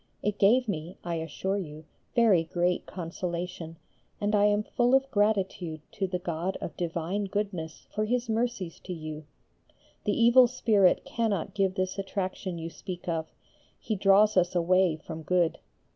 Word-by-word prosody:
It 210 0 -1
gave 240 +5 +5
me, 170 -3 -4
I 170 - -3
assure 175 +5 -2
you, 155 -3 -8 0.3
very 220 -8 +5
great 175 +1 0
consolation, 170 -1 -5 0.4
and 205 0 0
I 205 -1 +5
am 210 0 +3
full 245 +3 +2
of 270 0 +1
gratitude 195 -6 0
to 195 -3 -2
the 180 0 -2
God 175 +1 -3
of - - -6
divine 175 +4 -2
goodness 195 -5 -4
for 215 0 -1
His 245 +2 0
mercies 225 -6 -2
to 185 - -4
you. 155 -2 -7 0.8
The 205 - +1
evil 240 +2 +7
spirit 215 -6 +3
cannot 200 -5 -1
give 190 -2 +1
this 185 0 -2
attraction 190 -2 -3
you 165 0 -5
speak 180 -1 -8
of; 160 -2 -2 0.5
he 220 - -2
draws 200 +2 +4
us 180 0 +3
away 180 0 +3
from 160 +1 -8
good. 170 0 +1
185 Hz, 160 wpm, -28 LUFS, 170-210 Hz, 0.8 s, evil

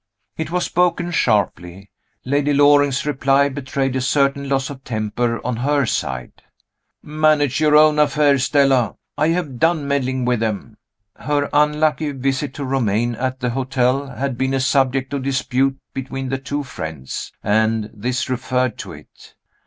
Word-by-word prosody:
It 160 -1 -4
was 180 +1 0
spoken 175 0 0
sharply. 100 - -1 0.3
Lady 145 +2 +1
Loring's 145 -1 +4
reply 140 -1 +2
betrayed 135 -1 -2
a 130 - 0
certain 140 +1 +1
loss 135 0 0
of 130 -2 -10
temper 115 +1 -2
on 125 -2 -1
her 140 +2 +1
side. 65 - -4 0.6
"Manage 150 -2 +1
your 150 -1 +4
own 150 0 +5
affairs, 145 -3 +3
Stella 135 -6 +2 0.2
I 155 - +1
have 160 -7 -2
done 160 -3 +2
meddling 130 -2 -1
with 125 -2 +1
them." 110 0 -3 0.4
Her 145 -1 -1
unlucky 150 0 +2
visit 135 +1 -2
to 145 - -4
Romayne 120 -3 0
at 130 +2 -3
the 125 - 0
hotel 130 +1 0
had 135 -1 -4
been 130 0 0
a - - +1
subject 135 0 +1
of 140 - -1
dispute 135 0 0 0.2
between 135 0 -5
the 135 0 -2
two 145 +2 -3
friends 80 - -6
and 110 0 +1
this 120 +3 -2
referred 125 -2 -1
to - - -7
it. - - -16
135 Hz, 155 wpm, -20 LUFS, 125-145 Hz, 0.6 s, own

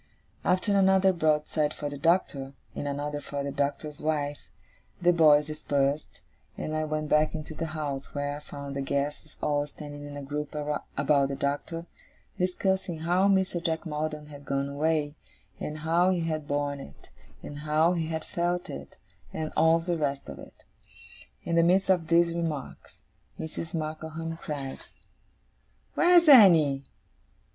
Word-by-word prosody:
After 185 +3 +2
another 190 -1 +5
broadside 155 -2 +1
for 145 - -4
the 145 -1 -6
Doctor, 145 -5 +1 0.2
and 145 - -4
another 145 +1 -3
for 140 -1 -4
the 140 - -3
Doctor's 145 +2 -2
wife, 145 -2 -2 0.5
the 175 0 +4
boys 150 -3 +6
dispersed, 145 -1 -1 0.4
and 155 - -3
I 155 0 0
went 155 0 -2
back 150 +1 +3
into 155 0 -6
the 165 +2 -3
house, 140 -3 -4
where 145 0 -2
I - - -8
found 140 -2 -8
the 140 - -1
guests 140 +2 -3
all 145 -1 +1
standing 145 0 -9
in 145 0 -8
a 140 - -6
group 150 +2 -4
about 145 -1 0
the 140 - -3
Doctor, 145 +4 -2 0.5
discussing 185 -2 0
how 180 +4 +3
Mr. 190 -3 +1
Jack 160 0 -1
Maldon 150 -1 -3
had 145 -1 -11
gone 140 0 -1
away, 150 0 0 0.5
and 150 - -4
how 170 +3 +3
he 180 -2 +1
had 155 -2 -2
borne 145 0 -1
it, 70 - -13 0.3
and 145 - -7
how 155 +3 +2
he 165 -2 -1
had 160 -1 -3
felt 175 +1 -2
it, - - -9 0.3
and 155 -1 -4
all 160 +1 +5
the 170 +1 -2
rest 140 -2 -2
of - - -8
it. - - -14 0.8
In 170 - -1
the - - +7
midst 185 +3 +4
of 175 -4 +1
these 170 0 +4
remarks, 165 -5 -5 0.4
Mrs. 160 +1 -5
Markleham 160 +1 -4
cried: 140 -5 -5 1.1
'Where's 350 -1 +5
Annie? 165 - +7
155 Hz, 155 wpm, -28 LUFS, 145-170 Hz, 1.1 s, the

